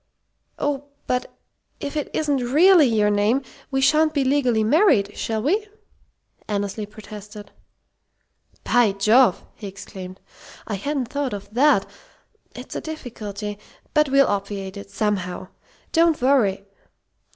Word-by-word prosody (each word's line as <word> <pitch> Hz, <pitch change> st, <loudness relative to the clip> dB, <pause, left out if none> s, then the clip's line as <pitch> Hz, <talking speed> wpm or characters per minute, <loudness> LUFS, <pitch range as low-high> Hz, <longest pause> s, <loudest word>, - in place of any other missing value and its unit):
"Oh, 285 Hz, -1 st, -2 dB, 0.2 s
but 250 Hz, 0 st, -1 dB, 0.5 s
if 285 Hz, -, -5 dB
it 300 Hz, -, -2 dB
isn't 295 Hz, -3 st, 0 dB
really 305 Hz, +6 st, +5 dB
your 210 Hz, -3 st, +2 dB
name, 210 Hz, +6 st, +2 dB, 0.3 s
we 270 Hz, -1 st, 0 dB
sha'n't 310 Hz, +3 st, +3 dB
be 280 Hz, -, +2 dB
legally 255 Hz, -5 st, +2 dB
married, 230 Hz, -, +3 dB
shall 220 Hz, -1 st, -2 dB
we?" 405 Hz, -, +1 dB, 0.8 s
Annesley 205 Hz, 0 st, -3 dB
protested. 210 Hz, 0 st, -11 dB, 1.1 s
"By 240 Hz, -5 st, +3 dB
Jove!" 215 Hz, +2 st, +4 dB
he 210 Hz, -, -9 dB
exclaimed. 190 Hz, -1 st, -9 dB, 0.5 s
"I 215 Hz, -, -5 dB
hadn't 260 Hz, +4 st, -2 dB
thought 280 Hz, -4 st, -2 dB
of 205 Hz, +1 st, -8 dB
that. 290 Hz, +5 st, +4 dB, 0.7 s
It's -, -, -9 dB
a -, -, -3 dB
difficulty. 210 Hz, -9 st, -6 dB, 0.3 s
But 300 Hz, -2 st, +3 dB
we'll 275 Hz, 0 st, +5 dB
obviate 200 Hz, -1 st, -3 dB
it 200 Hz, 0 st, -9 dB
somehow. 195 Hz, -3 st, -2 dB, 0.4 s
Don't 330 Hz, -1 st, +3 dB
worry! 235 Hz, -7 st, +2 dB
230 Hz, 125 wpm, -22 LUFS, 205-285 Hz, 1.1 s, really